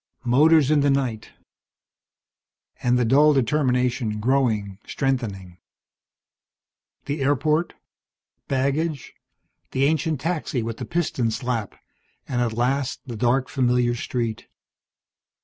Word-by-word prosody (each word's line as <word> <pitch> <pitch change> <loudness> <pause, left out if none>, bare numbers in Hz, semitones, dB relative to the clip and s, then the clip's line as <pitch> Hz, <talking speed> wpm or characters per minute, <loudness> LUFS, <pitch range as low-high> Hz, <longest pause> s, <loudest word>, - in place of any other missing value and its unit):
Motors 150 +4 +4
in 155 - +4
the 145 0 +3
night. 130 -6 -1 1.5
And 125 0 +2
the 125 - +2
dull 145 +6 +5
determination 125 -4 0
growing, 110 -5 0
strengthening. 105 -10 -3 1.5
The 145 +1 -3
airport, 150 +4 +1 0.7
baggage, 140 +2 -1 0.6
the 130 - +1
ancient 155 0 0
taxi 150 -6 -2
with 115 0 -5
the - - -5
piston 165 -9 -1
slap, 115 -1 -3 0.5
and 125 -2 -1
at 115 -2 0
last 130 +3 -1
the 120 -3 -6
dark, 125 +3 +1
familiar 125 -2 +1
street. 120 -1 -3
130 Hz, 105 wpm, -23 LUFS, 120-145 Hz, 1.5 s, dull